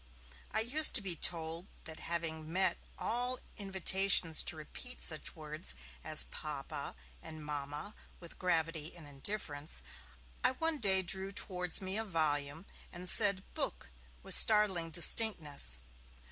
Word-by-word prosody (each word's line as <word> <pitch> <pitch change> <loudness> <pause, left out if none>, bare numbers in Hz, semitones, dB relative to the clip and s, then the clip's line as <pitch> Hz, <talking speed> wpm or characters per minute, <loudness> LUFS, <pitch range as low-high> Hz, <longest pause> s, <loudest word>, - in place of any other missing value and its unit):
I 220 - -2
used 295 +7 +4
to 230 - +6
be 185 -3 -2
told 165 +2 +1 0.2
that 160 -1 -8
having 160 -2 -4
met 190 +2 0 0.2
all 245 +2 -3 0.2
invitations 190 -4 +5
to - - 0
repeat 205 - -7
such 155 -2 -3
words 155 - 0 0.3
as - - +6
'Papa' 145 -3 -8 0.3
and 155 - -10
'Mamma' 145 +6 -6 0.3
with 170 -2 -13
gravity 165 -3 -2
and 170 -3 -10
indifference, 145 0 -4 0.6
I - - +2
one 320 +2 -4
day 190 -4 +2
drew 190 +2 -2
towards 180 -3 0
me 190 +3 -1
a - - -1
volume, 155 -3 -2 0.3
and 180 +1 -5
said 200 -1 +4
'book' 65 - -6 0.3
with - - +3
startling 205 -6 +5
distinctness. 155 - +2
175 Hz, 130 wpm, -32 LUFS, 155-200 Hz, 0.6 s, to